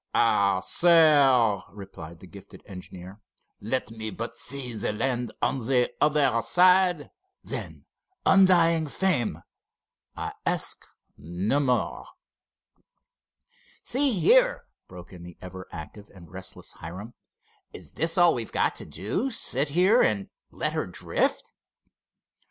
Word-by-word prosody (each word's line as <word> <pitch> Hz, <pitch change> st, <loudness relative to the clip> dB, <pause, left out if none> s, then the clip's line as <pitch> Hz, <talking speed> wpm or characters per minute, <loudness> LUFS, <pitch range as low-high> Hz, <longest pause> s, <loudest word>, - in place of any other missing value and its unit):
"Ah, 100 Hz, -2 st, +2 dB
sir," 140 Hz, -, +4 dB
replied 95 Hz, -5 st, -11 dB
the -, -, -12 dB
gifted 100 Hz, +2 st, -14 dB
engineer, 95 Hz, +1 st, -11 dB, 0.4 s
"let 115 Hz, +2 st, -3 dB
me 110 Hz, -1 st, -6 dB
but 115 Hz, +3 st, -7 dB
see 130 Hz, -3 st, -5 dB
the 110 Hz, -, -2 dB
land 120 Hz, +1 st, -2 dB
on 135 Hz, -, 0 dB
the 125 Hz, -2 st, +1 dB
other 145 Hz, -6 st, +2 dB
side—then, 185 Hz, -, 0 dB, 0.4 s
undying 170 Hz, -4 st, +4 dB
fame! 145 Hz, -, -1 dB, 0.7 s
I -, -, -5 dB
ask -, -, -2 dB, 0.3 s
no 90 Hz, -, -2 dB
more." 125 Hz, -4 st, -1 dB, 1.8 s
"See 265 Hz, -4 st, +2 dB
here," -, -, +4 dB, 0.2 s
broke 90 Hz, +1 st, -13 dB
in 90 Hz, -, -12 dB
the 85 Hz, 0 st, -12 dB
ever 95 Hz, 0 st, -10 dB
active 100 Hz, +7 st, -10 dB
and 85 Hz, -4 st, -15 dB
restless -, -, -9 dB
Hiram, 95 Hz, +9 st, -10 dB, 0.6 s
"is -, -, -11 dB
this 165 Hz, +2 st, -1 dB
all 175 Hz, -1 st, +5 dB
we've 115 Hz, -3 st, -5 dB
got -, -, 0 dB
to -, -, -8 dB
do—sit 140 Hz, -, -1 dB
here 185 Hz, +10 st, +3 dB
and 100 Hz, -2 st, 0 dB, 0.2 s
let -, -, -3 dB
her -, -, -2 dB
drift?" -, -, -2 dB
125 Hz, 115 wpm, -25 LUFS, -, 1.8 s, all